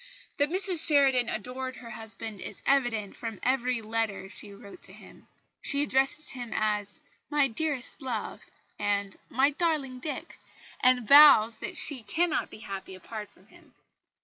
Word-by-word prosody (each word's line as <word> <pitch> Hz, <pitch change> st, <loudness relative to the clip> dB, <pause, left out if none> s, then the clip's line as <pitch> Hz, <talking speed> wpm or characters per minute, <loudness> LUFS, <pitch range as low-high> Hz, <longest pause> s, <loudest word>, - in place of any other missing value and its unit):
That 285 Hz, +1 st, +2 dB
Mrs 370 Hz, -2 st, +4 dB
Sheridan 270 Hz, -5 st, +4 dB
adored 255 Hz, +4 st, -5 dB
her 235 Hz, -2 st, -11 dB
husband 220 Hz, -2 st, -7 dB
is -, -, -8 dB
evident 240 Hz, -7 st, +1 dB
from 225 Hz, -4 st, -7 dB
every 250 Hz, -2 st, 0 dB
letter 215 Hz, -3 st, -3 dB
she 205 Hz, -, -11 dB
wrote 200 Hz, -, -13 dB
to -, -, -10 dB
him. -, -, -16 dB, 0.3 s
She 285 Hz, 0 st, +1 dB
addresses 270 Hz, +2 st, 0 dB
him 245 Hz, -3 st, -6 dB
as 210 Hz, -2 st, -1 dB, 0.3 s
"my 295 Hz, -2 st, +3 dB
dearest 275 Hz, +2 st, -3 dB
Love" 240 Hz, -5 st, -4 dB, 0.4 s
and 200 Hz, -1 st, -1 dB
"my 270 Hz, +4 st, +2 dB
darling 290 Hz, -5 st, -1 dB
Dick," 300 Hz, +3 st, -6 dB, 0.4 s
and 250 Hz, -3 st, +3 dB
vows 275 Hz, -6 st, +8 dB
that -, -, -6 dB
she 275 Hz, -5 st, 0 dB
cannot 320 Hz, +9 st, -1 dB
be 215 Hz, -, -12 dB
happy 195 Hz, -1 st, -7 dB
apart 210 Hz, +3 st, -8 dB
from -, -, -25 dB
him. -, -, -21 dB
250 Hz, 150 wpm, -28 LUFS, 215-280 Hz, 0.4 s, vows